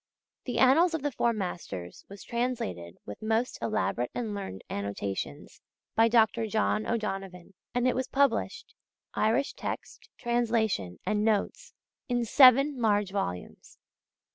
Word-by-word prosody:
The 245 -3 -3
Annals 325 +7 +5
of 310 - -4
the 290 - 0
Four 235 -1 +1
Masters 175 - -6
was 200 0 -10
translated 160 - -3
with 105 - -9
most 225 +3 0
elaborate 210 - -1
and 225 -4 -3
learned 195 - -6
annotations 100 -1 -5 0.3
by 225 +1 +5
Dr. 225 -1 +3
John 215 0 0
O'Donovan; 195 -5 -4 0.2
and 245 +1 +2
it 255 - +3
was 260 0 -2
published 280 - 0 0.4
Irish 230 +6 +1
text, - - -6
translation, 225 - 0
and 210 0 0
notes 225 - -1 0.3
in 245 -1 +1
seven 265 +2 +6
large 205 -3 +2
volumes. 90 - -5
220 Hz, 130 wpm, -28 LUFS, 195-245 Hz, 0.4 s, seven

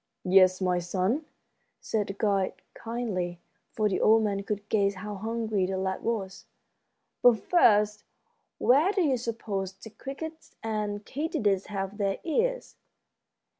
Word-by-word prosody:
"Yes, 185 0 +5
my 180 -1 +2
son," 185 - -1 0.5
said 210 -2 -1
the 195 - -4
guide, 200 -2 +1 0.2
kindly, 205 -7 -3 0.3
for 215 -1 +1
the 195 - -1
old 220 +1 +5
man 200 -2 0
could 205 0 -4
guess 200 -2 +2
how 205 +3 -6
hungry 220 -2 -1
the 190 0 -2
lad 190 0 -2
was. 195 -5 -3 0.7
"But, 245 -2 +6
first, 210 - +3 0.5
where 290 +10 +4
do 390 -3 +1
you 275 -5 +2
suppose 215 -5 -3
the 205 +3 -12
crickets 320 +7 -8
and 210 -2 -2
katydids 215 -10 -1
have 195 0 -4
their 195 -1 0
ears?" - - -1
210 Hz, 135 wpm, -28 LUFS, 195-230 Hz, 0.7 s, But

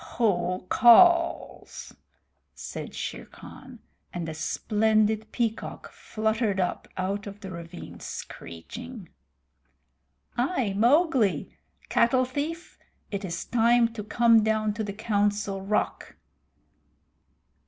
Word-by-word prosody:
"Who 185 -5 0
calls?" 335 - +4 0.6
said - - -7
Shere - - -5
Khan, 255 -3 -13 0.3
and 175 -2 -5
a 160 - -4
splendid 215 +5 0
peacock 230 -2 -3
fluttered 220 -2 -1
up 180 - -2
out 195 +2 -2
of 200 +1 -9
the 190 -3 -7
ravine 170 0 -9
screeching. 210 - -9 1.3
"I, 245 - 0
Mowgli. 245 - +2 0.3
Cattle 255 +2 +3
thief, 300 +6 -5 0.3
it 200 -1 -3
is 170 -3 -4
time 235 0 +3
to 215 -2 -6
come 230 +1 +4
to 215 0 0
the 205 - -4
Council 205 -2 -1
Rock! 205 +2 -2
215 Hz, 100 wpm, -26 LUFS, 195-240 Hz, 1.3 s, calls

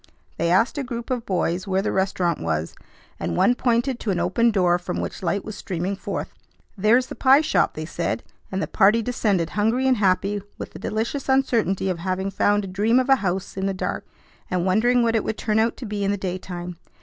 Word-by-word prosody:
They 170 +1 0
asked 225 - +2
a - - -1
group 240 0 -6
of 245 -3 -2
boys 185 0 -1
where 190 0 +1
the - - 0
restaurant 185 -3 0
was, 80 -1 -2 0.5
and 85 0 -2
one - - +4
pointed 245 +1 0
to 220 - -4
an 185 -3 +1
open 190 +7 +2
door 180 -5 +2
from 175 - -4
which - - -5
light 195 +2 -1
was 215 - -6
streaming 185 +1 -3
forth. 195 - -5 0.4
"There's 225 +5 +3
the - - -8
pie 270 +2 +5
shop," 315 - +1
they 155 - -4
said, 110 -8 -3 0.3
and 190 +1 -1
the - - -2
party 215 +3 +4
descended 200 -8 0
hungry 225 +5 +1
and 260 -2 +3
happy 200 +1 +1 0.2
with - - -7
the - - -10
delicious 235 +6 -3
uncertainty 235 -8 +2
of 180 -3 -1
having 190 +2 -2
found 205 +1 +2
a - - -5
dream 210 +6 +2
of 260 +1 -1
a 270 - +6
house 190 -3 -3
in 190 0 -1
the 195 - -1
dark, - - -3 0.5
and 180 -1 0
wondering 235 +6 +3
what 230 -1 +2
it 220 - +1
would 220 - -3
turn 215 0 0
out 230 +1 +1
to 255 - -7
be 205 -1 -3
in 195 - +1
the 205 - 0
daytime. 180 -2 -5
200 Hz, 220 wpm, -23 LUFS, 185-235 Hz, 0.5 s, a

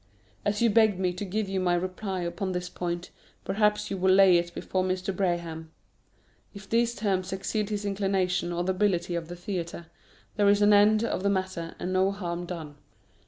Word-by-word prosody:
As 205 +2 0
you 230 - +4
begged 215 -3 +4
me 185 -1 0
to 180 - -5
give 205 +2 -2
you 190 0 -1
my 180 -1 +2
reply 185 +1 -3
upon 175 +2 -3
this 180 0 -3
point, 175 0 -4 0.3
perhaps 210 +1 +1
you 195 - -2
will 190 +1 +3
lay 190 -2 +7
it 170 0 -4
before 185 -1 -1
Mr. 185 +1 -2
Braham. 170 -4 -2 0.9
If 200 0 -10
these 235 +1 +1
terms 190 -3 -1
exceed 200 +2 -2
his 205 -1 -3
inclination 195 -3 0
or 175 0 -1
the 190 - 0
ability 180 -3 0
of 170 -1 -3
the 175 - -7
theatre, 175 -2 -5 0.5
there 205 -1 +4
is 205 0 +4
an 205 0 +6
end 210 +2 +5
of 230 - -1
the 200 - +1
matter, 185 -4 -2
and 185 - -3
no 190 +1 +3
harm 175 -3 -4
done. 160 -5 -7
185 Hz, 195 wpm, -27 LUFS, 175-205 Hz, 0.9 s, lay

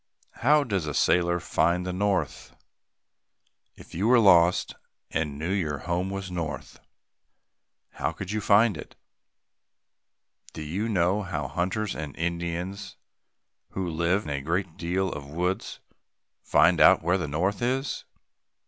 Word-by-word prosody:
How 150 +4 +4
does 100 - -2
a 75 - -3
sailor 85 0 +2
find 90 +2 0
the 90 - -3
north? 95 -5 -2 1.2
If - - -15
you 95 +6 0
were 125 +1 +6
lost 90 -5 +5 0.4
and 75 -3 -2
knew 80 +5 -3
your 80 -7 -1
home 90 +2 -1
was 95 -1 -5
north, 85 -4 -5 1.1
how - - -3
would 95 0 -5
you 110 0 -1
find 105 +1 +4
it? - - -10 1.6
Do 80 - -6
you 95 +9 -3
know 95 0 +1
how 75 -8 -4
hunters 95 - -2
and 75 -3 -6
Indians 85 +3 -4 0.8
who 95 -1 -2
live 85 +4 0
a 70 -1 -3
great 85 +3 -2
deal 90 +2 -1
in 75 - -5
the 70 - -12
woods 90 +2 -2 0.6
find 80 +2 +3
out - - +7
where 90 +3 +2
the 85 - -3
north 90 +8 -1
is? 130 +3 -1
90 Hz, 140 wpm, -26 LUFS, 85-100 Hz, 1.6 s, out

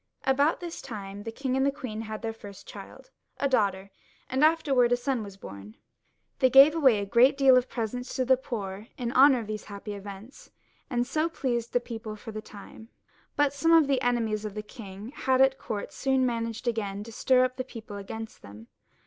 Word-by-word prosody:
^ - - -52 0.3
About 285 +6 +2
this 345 -1 -6
time 205 -5 -7
the 225 - -6
king 260 +2 -2
and 275 +1 +1
queen 230 -7 -5
had 220 0 -7
their 225 0 -2
first 205 -3 -12
child, - - -11 0.3
a 280 - +2
daughter, 200 -6 0 0.4
and 260 +2 0
soon 310 +1 +7
afterwards 270 -7 +2
a - - +3
son. 195 - -5 0.6
They 260 - +5
gave 275 +4 +8
away 270 -9 +4
a 200 - -2
great 245 +7 +4
deal 270 -2 +6
in 255 - +6
presents 245 0 -5
to 255 - 0
the 260 +1 +5
poor 210 -5 -6
in 240 -2 -3
honour 265 -1 +6
of - - -7
these 215 0 -6
happy 205 0 -7
events, 200 +4 -10 0.4
and 245 -2 0
so 310 +5 0
pleased 240 -7 -2
the 245 - +4
people 225 -3 -7
for 225 +2 -9
a 215 - -4
time; 215 +2 -13 0.5
l}ut 290 -1 +3
some 330 +4 +2
of 325 -2 +7
the 275 -2 +1
enemies 230 -3 0
the 210 0 -5
king 210 -1 -10
had 260 -2 0
at 265 0 +4
court 205 -2 -5
soon 265 -1 +1
man 230 -2 -1
aged 230 +2 -7
to 215 -2 -3
stir 255 +3 +3
up 255 0 -5
the 255 - -2
people 230 -5 -9
again 200 +3 -6
against 220 - -13
him. 105 +3 -13
235 Hz, 205 wpm, -27 LUFS, 210-265 Hz, 0.6 s, gave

